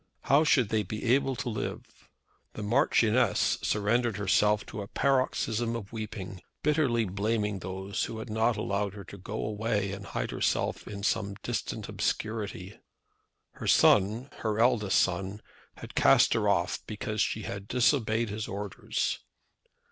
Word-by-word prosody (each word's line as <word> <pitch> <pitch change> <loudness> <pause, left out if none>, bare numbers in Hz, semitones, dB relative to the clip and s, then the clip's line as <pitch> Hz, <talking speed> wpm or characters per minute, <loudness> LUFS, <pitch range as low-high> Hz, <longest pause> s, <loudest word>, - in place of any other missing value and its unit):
How 140 +4 +4
should 125 -8 +3
they 110 -1 +1
be 105 +2 -5
able 135 -1 +2
to 120 - -5
live? 110 -3 -6 0.4
The 105 - -6
Marchioness 115 0 +3
surrendered 110 +2 +1
herself 105 +1 +2
to 105 - -6
a 100 - -6
paroxysm 120 -3 0
of 105 -2 -7
weeping, 100 -4 -6 0.2
bitterly 140 -7 +2
blaming 105 +1 -1
those 95 +3 -3
who 110 - -6
had 110 - -6
not 110 +1 +1
allowed 100 -1 -1
her 100 - -8
to 100 - -11
go 105 +4 -4
away 105 -2 -1
and 100 0 -7
hide - - -3
herself - - -1
in 100 -1 -7
some 100 -1 0
distant 120 -4 -3
obscurity. 105 -3 -3 0.7
Her - - -7
son, 110 +7 +4
her 110 -2 -2
eldest 115 -5 +3
son, 95 +3 0 0.4
had - - -10
cast - - +5
her - - +1
off - - +1
because 110 0 -3
she 110 - 0
had 100 +1 -6
disobeyed 120 -3 +2
his 105 +1 -4
orders! 100 0 -3
105 Hz, 150 wpm, -29 LUFS, 100-115 Hz, 0.7 s, cast